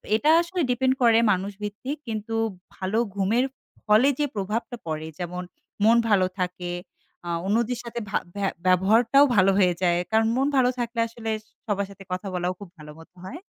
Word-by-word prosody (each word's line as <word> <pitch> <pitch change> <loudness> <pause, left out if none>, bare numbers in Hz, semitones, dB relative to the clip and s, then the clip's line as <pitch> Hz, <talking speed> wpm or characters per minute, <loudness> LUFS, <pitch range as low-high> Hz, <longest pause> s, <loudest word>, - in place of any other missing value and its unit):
এটা 295 +7 +2
আসলে 350 +1 -3
ডিপেন্ড 260 +1 +2
করে 230 -2 +6
মানুষ 195 +2 -1
ভিত্তিক। 215 +8 -4
কিন্তু 220 0 -4 0.4
ভালো 190 +3 -2 0.2
ঘুমের 220 +7 +2 0.4
ফলে 215 +6 +5
যে 295 - +2
প্রভাবটা 215 +5 -3
পড়ে 155 0 -3
যেমন 180 +1 -4 0.4
মন 225 +2 +6
ভালো 195 -3 +4
থাকে, 180 -1 -3 0.6
আ - - -3 0.2
অন্যদের 235 +4 0
সাথে 235 0 -5
ভা - - +1 0.2
ভ্যা 200 -1 0 0.2
ব্যবহারটাও 225 +9 +5
ভালো 195 0 +5
হয়ে 180 -3 +4
যায়। 175 -1 +3
কারণ 220 0 +3
মন 270 - +2
ভালো 250 -1 +4
থাকলে 235 0 -3
আসলে 225 -1 -7 0.4
সবার 200 -2 -1
সাথে 200 0 -12
কথা 185 +2 -3
বলাও 180 0 -1
খুব 200 - -10
ভালো 150 -1 -11
মত 165 - -15
হয়। 265 - -7
210 Hz, 175 wpm, -25 LUFS, 185-235 Hz, 0.6 s, করে